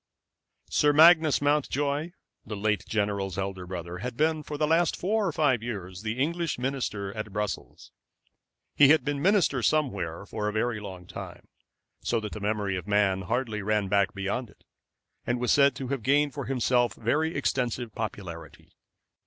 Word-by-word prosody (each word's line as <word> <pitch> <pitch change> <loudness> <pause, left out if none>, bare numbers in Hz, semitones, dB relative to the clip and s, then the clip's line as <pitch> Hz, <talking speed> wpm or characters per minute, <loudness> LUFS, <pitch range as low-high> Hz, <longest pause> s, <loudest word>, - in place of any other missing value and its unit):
Sir 145 0 +3
Magnus 160 -1 +6
Mountjoy, 145 +2 0 0.3
the 105 - -6
late 105 +1 0
general's 100 -3 -1
elder 95 -2 -4
brother, 90 -1 -6
had 125 +3 -5
been 155 0 +2
for 150 0 -6
the 150 - +2
last 165 +1 +2
four 210 +2 0
or - - 0
five 145 -6 +2
years 95 -6 -6
the 110 +2 -3
English 165 +3 -1
minister 120 -6 -3
at 110 -1 -5
Brussels. 105 0 -5 0.8
He 145 - +7
had 145 -2 +4
been 145 -1 -1
minister 185 -8 +3
somewhere 100 - 0
for 105 +1 -3
a - - 0
very 110 +1 0
long 95 -3 -9
time, - - -9 0.5
so 115 - 0
that 105 -2 -6
the - - -6
memory 105 -1 -1
of 90 0 -5
man 100 -2 +2
hardly 110 +1 -2
ran 105 -1 0
back 100 0 +2
beyond 100 +5 -3
it, - - -23 0.6
and 120 0 0
was 125 -1 +1
said 140 -2 +5
to 135 -2 -5
have 135 -3 -2
gained 145 +3 +2
for 140 -3 -5
himself 125 -2 +1
very 155 +8 0
extensive 125 -4 -1
popularity. 90 -7 -7
120 Hz, 170 wpm, -27 LUFS, 100-145 Hz, 0.8 s, He